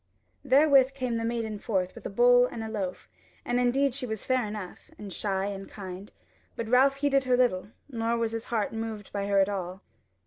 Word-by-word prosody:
Therewith 275 -1 +5
came 250 -3 -2
the 230 - -2
maiden 225 -2 -2
forth 185 -5 -1
with - - -13
the - - -2
bowl 245 +4 +5
and 230 -2 -6
the 220 - -5
loaf; 195 -4 -4 0.4
and 245 0 +1
indeed 260 +2 +2
she 250 0 -4
was 220 -2 -4
fair 255 -4 +1
enough, 210 +4 -8
and 200 -7 -8
shy 195 -2 -1
and 195 -1 -5
kind; 190 0 -8 0.4
but 230 - -4
Ralph 260 +4 +4
heeded 275 -1 +1
her 250 -1 +3
little, 235 -7 +1 0.2
nor 230 -3 -1
was 230 -1 -1
his 230 0 -4
heart 220 -3 -1
moved 225 -2 -5
by 200 -1 -2
her 200 0 +2
at 195 -1 +5
all. 190 -1 -5
225 Hz, 205 wpm, -28 LUFS, 200-250 Hz, 0.4 s, Therewith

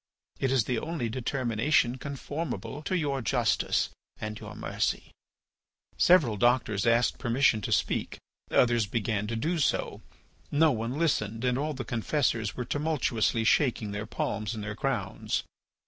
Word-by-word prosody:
It 135 - +1
is 130 -4 +3
the 125 0 -1
only 155 -6 -3
determination 125 +1 +1
conformable 145 +1 -5
to 185 - +1
your 140 -5 -1
justice 120 -1 +1 0.3
and 110 0 -5
your - - -9
mercy.'" - - -2 0.8
Several 150 - +4
doctors 120 -2 +2
asked 115 +1 +3
permission 120 -1 +2
to - - -4
speak, - - 0 0.3
others 120 -3 +3
began 105 -1 -1
to 115 - -3
do 160 +9 -1
so. 145 - 0 0.5
No 155 +1 +4
one 115 +2 -2
listened, 115 -8 0
and 125 -1 +2
all 150 +3 -2
the 130 - -5
confessors 115 -3 0
were 125 - -3
tumultuously 130 -6 0
shaking 115 -3 +2
their 105 +1 -4
palms 110 0 -2
and 105 - -5
their 105 0 -4
crowns. - - -2
120 Hz, 145 wpm, -28 LUFS, 110-140 Hz, 0.8 s, Several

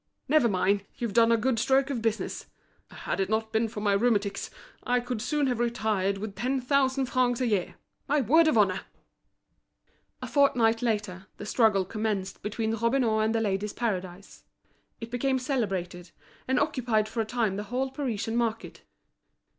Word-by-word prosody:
Never 300 -6 +4
mind, 200 +1 +1
you've 235 -4 -3
done 230 0 +5
a 230 - +4
good 230 +1 0
stroke 270 +3 +2
of 245 -4 -2
business. 225 -1 -2 0.4
Had - - -4
it 190 0 0
not 220 0 -1
been 220 +1 +2
for 215 -1 -7
my 205 -1 +2
rheumatics, 200 -2 +1 0.3
I 245 0 +1
could 245 -2 -4
soon 295 +2 0
have 250 -3 -1
retired 215 -5 0
with 205 0 -6
ten 255 +6 -1
thousand 265 +1 +1
francs 250 -1 +1
a 255 - +1
year. 205 -6 -1 0.3
My 295 +2 +2
word 315 +7 +4
of 275 - +3
honour!" 195 -3 +3 1.4
A - - -6
fortnight 235 -6 +3
later, 205 -5 -2
the - - -7
struggle 210 -4 +3
commenced 205 -2 -3
between 220 +1 -2
Robineau 230 -1 +1
and 220 +1 +1
The 225 - +1
Ladies' 205 0 -1
Paradise. 190 -4 -4 0.6
It 230 0 -8
became 260 +2 0
celebrated, 190 -9 -3 0.4
and 260 0 +2
occupied 245 -8 0
for 225 +1 -2
a - - -2
time 220 -4 -1
the 205 +1 -4
whole 260 +4 -2
Parisian 235 -5 -3
market. 230 -2 -2
225 Hz, 170 wpm, -27 LUFS, 205-250 Hz, 1.4 s, done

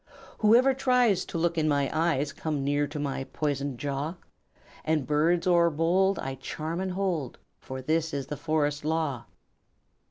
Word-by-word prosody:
"Whoever 240 +5 +5
tries 250 -6 +2
To - - -5
look 170 0 +1
in 155 - +1
my 140 -2 +2
eyes 155 -3 +1
Comes 150 -3 -3
near 145 +1 +1
to 145 +2 -7
my 140 -2 -3
poisoned 140 -3 -2
jaw; 145 +4 -3 0.7
And 155 -3 0
birds 160 +5 +2
o'erbold 175 +2 +3
I 135 - -4
charm 160 +5 -4
and 190 -1 -2
hold, 180 -9 -2 0.2
For 130 0 -7
this 160 +3 0
is 140 -3 -3
the 150 - -5
Forest 150 -1 -1
Law." 155 -5 -1
155 Hz, 155 wpm, -27 LUFS, 145-170 Hz, 0.7 s, Whoever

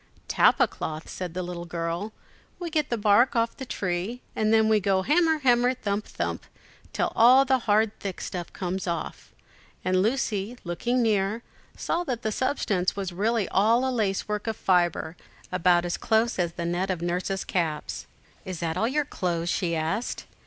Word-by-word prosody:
"Tapa - - +4
cloth," 155 0 -6
said 180 -2 -6
the 185 - -2
little 175 -1 -6
girl. 170 +4 -3 0.5
"We 345 -2 -5
get 305 -3 0
the 235 - 0
bark 215 +4 +4
off 230 0 +1
the 265 - -8
tree, 190 +6 -3
and 215 0 +1
then 220 -1 +5
we 220 -1 +4
go 190 -1 +1
hammer, 320 - +3
hammer, 250 -2 +3
thump, 210 -4 -2
thump, - - -4 0.5
till - - -1
all 255 +4 +7
the 265 -1 +3
hard 215 +1 +3
thick 195 -3 -5
stuff 175 -2 -5
comes 185 +1 -4
off;" 170 -2 -4 0.5
and 185 0 +3
Lucy, 220 -1 -1
looking 240 +8 0
near, 215 +1 +1 0.3
saw 345 - -1
that 245 -5 -3
the 220 - 0
substance 205 -7 0
was 195 -2 -3
really 210 +3 0
all 230 +6 +3
a 260 - -1
lacework 210 -1 -1
of 225 - -2
fibre, 175 -3 +1 0.4
about 180 -1 +3
as 175 - -2
close 225 -1 +1
as 170 -2 0
the 170 - -4
net 175 +3 -1
of 180 -3 -2
Nurse's 180 +2 -1
caps. 160 -4 -2 0.4
"Is 185 -4 -6
that 165 0 -2
all 225 - +2
your 290 +4 0
clothes?" 175 -8 -2
she 175 -2 0
asked. 160 +9 -2
200 Hz, 175 wpm, -26 LUFS, 175-235 Hz, 0.5 s, all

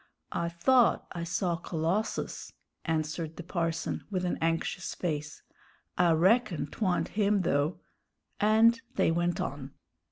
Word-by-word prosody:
"I 170 0 -1
thought 240 +9 +3
I 170 -2 -4
saw 170 0 -1
Colossus," 170 +5 -2 0.3
answered 160 0 -2
the 175 - -7
parson, 165 -2 -2
with 185 -3 -1
an 180 - -1
anxious 165 +2 -1
face; 150 -4 -4 0.5
"I 175 -2 +4
reckon 180 - +3
'twa'nt 180 +4 -1
him, 205 -2 +2
though." 145 +1 0 0.6
And 225 +2 +5
they - - +3
went 175 +1 0
on. 135 -1 -5
170 Hz, 125 wpm, -29 LUFS, 160-195 Hz, 0.6 s, And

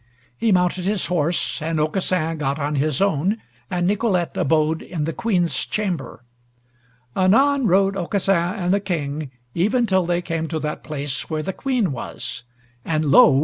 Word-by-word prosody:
He 225 - +1
mounted 180 0 +2
his 200 -1 0
horse, 170 -1 0
and 160 0 -1
Aucassin 165 0 0
gat 140 -1 -1
on 150 0 -2
his 150 +3 +1
own, 195 +3 +1 0.3
and 180 -2 0
Nicolete 195 -3 +1
abode 155 +1 +1
in 165 -4 -4
the 160 +2 -2
Queen's 180 -6 0
chamber. 190 -10 -3 0.9
Anon 260 +8 +4
rode 195 +1 +3
Aucassin 190 0 0
and 180 -3 0
the 200 - +3
King 155 -6 -3 0.2
even 220 +8 +2
till 190 -4 +1
they 175 0 0
came 165 -1 -2
to 160 - -3
that 150 -1 -4
place 145 -3 -4
where 155 -1 -2
the 190 - -3
Queen 250 - 0
was, 125 0 -5 0.4
and 155 -3 0
lo! 135 -1 +7
175 Hz, 160 wpm, -22 LUFS, 155-195 Hz, 0.9 s, lo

